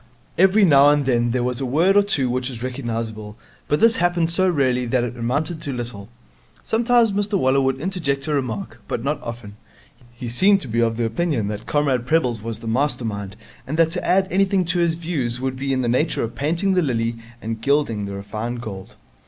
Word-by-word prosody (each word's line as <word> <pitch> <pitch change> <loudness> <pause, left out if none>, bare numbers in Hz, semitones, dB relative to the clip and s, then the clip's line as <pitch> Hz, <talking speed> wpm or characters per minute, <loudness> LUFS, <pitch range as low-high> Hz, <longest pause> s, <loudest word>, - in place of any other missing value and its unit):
Every 195 +3 +5
now 140 -3 +6
and 145 -1 +2
then 120 -2 +2
there 120 +1 0
was 125 +1 -2
a - - -1
word 165 +9 +3
or 205 - +7
two 145 -10 +1
which 125 +1 -2
was 120 -2 -7
recognizable, 115 -5 -5 0.3
but 150 - +1
this 230 0 +4
happened 175 -1 +1
so 185 +2 +2
rarely 130 -6 +1
that 120 0 +1
it 120 0 -4
amounted 145 +7 -2
to 140 - -4
little. 115 -4 -6 0.5
Sometimes 235 0 +3
Mr 205 +1 0
Waller 135 -3 +2
would 135 0 0
interject 145 -6 -2
a 155 - -1
remark, 125 -8 -3
but 115 - -3
not 145 +2 -1
often. 115 -3 -8 0.5
He 120 +1 -8
seemed 195 - +4
to - - -6
be 115 0 -1
of 115 -1 +1
the 120 - 0
opinion 115 -3 -1
that 105 0 -6
Comrade 135 -5 0
Prebble's 125 -8 +1
was 115 0 -5
the 115 - -7
master 125 +1 +1
mind 100 -2 -5 0.3
and 155 +4 -3
that 165 -1 +3
to 180 - -2
add 190 +1 +2
anything 190 0 +2
to 180 - 0
his 170 -1 +2
views 145 -8 -2
would 130 0 -2
be 135 +1 -3
in 130 -1 0
the - - 0
nature 130 +7 +1
of 115 0 -4
painting 170 +8 0
the 185 - +3
lily 115 -5 -1 0.2
and 115 -1 -5
gilding 140 -7 +1
the 100 0 -6
refined 110 +5 -5
gold. 100 -5 -8
130 Hz, 215 wpm, -21 LUFS, 115-165 Hz, 0.5 s, or